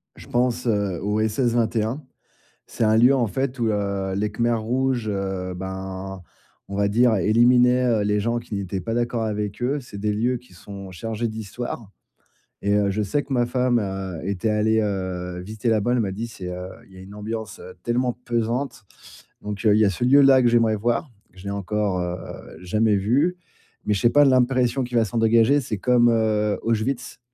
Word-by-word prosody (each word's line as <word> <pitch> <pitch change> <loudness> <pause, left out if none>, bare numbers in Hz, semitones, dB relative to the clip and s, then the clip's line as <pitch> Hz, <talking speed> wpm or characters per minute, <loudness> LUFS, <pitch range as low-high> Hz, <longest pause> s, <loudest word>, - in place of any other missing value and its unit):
je - - -13
pense 125 0 0
au 100 -1 0
SS21. 115 +2 0 0.7
C'est - - -3
un 110 0 +4
lieu, 125 +4 +6
en 120 -3 +1
fait, 130 +6 -3
où, 115 - +1
heu, 100 -2 -2
les 105 +1 -1
Khmers 115 0 0
rouges, 125 0 -1
heu, 95 -2 -3
ben, 95 0 -6 0.5
on 100 - -5
va 100 0 +2
dire 115 +3 +3
éliminaient, 125 +5 +4
heu, 115 -4 +2
les 105 0 +1
gens 115 +2 0
qui 115 - -7
n'étaient 95 -1 -3
pas 115 +6 -3
d'accord 120 -1 -1
avec 105 0 -3
eux. 140 +4 0
C'est 120 -5 -10
des 105 +1 0
lieux 120 +4 0
qui 125 -5 -19
sont 100 +2 -10
chargés 115 +5 -3
d'Histoire 110 0 -6 0.7
et 100 +1 +1
heu, 100 -1 +2
je 105 +2 -1
sais 140 +9 -1
que 140 - -5
ma 120 -2 +2
femme 125 0 +1
a 95 -4 -4
était 100 +3 -1
allée, 110 +1 +2
heu, 95 -3 -3
visiter 110 +5 -6
là 110 -2 +2
bas. 120 - 0
Elle 125 - +2
m'a 100 -3 -2
dit: 115 +4 -4
«C'est, 95 -5 -8
heu 90 +1 -6 0.2
il 95 - -20
y - - -13
a - - -10
une 95 +2 -12
ambiance 110 0 -6 0.2
tellement 120 +1 0
pesante». 120 +1 -2 0.6
Donc, 105 +1 -6
il 105 - +6
y 110 - +4
a - - +3
ce 120 +5 -2
lieu-là 135 0 +6
que 120 - +3
j'aimerais 115 -2 +3
voir. 120 +6 -1 0.2
Je 95 0 -14
l'ai - - -3
encore, 100 -1 -1
heu, 90 0 -2 0.5
jamais 105 +4 +1
vu, 130 - +1 0.5
mais 105 - +2
je 100 - -1
sais 120 - +5
pas 145 +4 +5
l'impression 130 0 +2
qu'il 120 0 -2
va 115 - +5
s'en 110 - -4
dégager. 115 +5 +4
C'est 115 -5 -4
comme, 120 +3 +3
heu, 110 -2 +1
Auschwitz. 115 +3 -2
110 Hz, 200 wpm, -23 LUFS, 100-120 Hz, 0.7 s, lieu